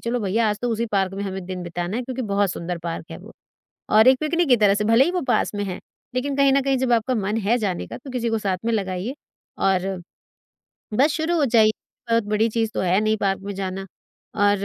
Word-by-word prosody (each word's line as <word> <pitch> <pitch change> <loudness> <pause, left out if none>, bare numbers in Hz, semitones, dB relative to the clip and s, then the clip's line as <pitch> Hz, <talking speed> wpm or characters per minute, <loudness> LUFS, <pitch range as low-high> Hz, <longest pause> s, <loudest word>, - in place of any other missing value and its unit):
चलो 245 0 0
भैया, 215 +2 +1
आज 210 - -3
तो 245 - 0
उसी 230 +1 -1
पार्क 195 -1 +1
में 200 - -4
हमें 190 -1 -5
दिन 185 -1 -5
बिताना 175 +3 -4
है 250 - -2
क्योंकि 255 +1 -4
बहुत 200 -3 +1
सुंदर 170 +1 -4
पार्क 165 -1 -5
है - - -6
वो। - - -13 0.6
और 220 +3 +6
एक 260 0 +6
पिकनिक 335 +2 +1
की 250 - +6
तरह 205 -3 +4
से, 210 +1 -1
भले 230 +4 +5
ही 345 - 0
वो 360 0 -1
पास - - +1
में 205 0 -2
है 185 -2 -4 0.4
लेकिन 275 +3 -1
कहीं 275 -1 +4
न 275 - +4
कहीं 270 0 +1
जब 255 -1 +1
आपका 235 +2 +2
मन 210 -1 -1
है 225 +4 +3
जाने 195 -6 -2
का - - -8
तो 265 +2 -10
किसी 245 -2 -2
को 225 - +1
साथ 195 -3 -1
में 230 - 0
लगाइए 195 +2 -2 0.4
और 190 -1 +1 1.1
बस 285 +4 +5
शुरू 330 +2 0
हो 310 - +3
जाइए, 225 -4 +5 0.4
बहुत 230 -1 +3
बड़ी 210 +2 +1
चीज़ 225 0 -1
तो - - -1
है 185 +2 +2
नहीं 215 0 +1
पार्क 195 -1 0
में 200 0 -5
जाना। 195 0 -4 0.5
और 205 -1 +2
215 Hz, 245 wpm, -23 LUFS, 195-245 Hz, 1.1 s, और